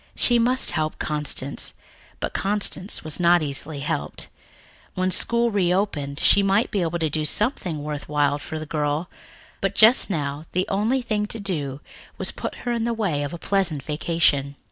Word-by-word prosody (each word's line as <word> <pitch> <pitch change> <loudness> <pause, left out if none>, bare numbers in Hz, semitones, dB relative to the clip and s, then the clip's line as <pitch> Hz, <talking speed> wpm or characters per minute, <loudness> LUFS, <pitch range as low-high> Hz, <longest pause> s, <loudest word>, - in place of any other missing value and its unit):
She 240 -1 +4
must 250 +3 +3
help 155 -1 -2
Constance, 150 -2 -2 0.4
but - - -3
Constance 200 -1 0
was 155 +1 -1
not 175 -1 +4
easily 145 +1 -1
helped. 75 - -3 0.7
When 185 0 0
school 235 +5 +2
reopened, 180 -7 0
she 200 - +5
might 195 +3 +2
be 200 - 0
able 170 0 -1
to 160 -2 0
do 155 +1 -2
something 175 - 0
worthwhile 145 -1 -1
for 155 +2 -6
the 155 - -5
girl, 150 +2 -2 0.5
but - - -1
just 225 +2 +6
now 145 -4 -3
the 185 +1 0
only 225 +6 +1
thing 210 -3 -1
to 225 - -5
do 150 -9 -2 0.4
was - - 0
to - - -8
put - - -5
her 240 - 0
in 235 -1 -1
the 235 0 -1
way 185 -10 -1
of 145 0 -3
a 170 - -6
pleasant 170 -6 0
vacation. 150 -2 +1
170 Hz, 175 wpm, -23 LUFS, 150-205 Hz, 0.7 s, just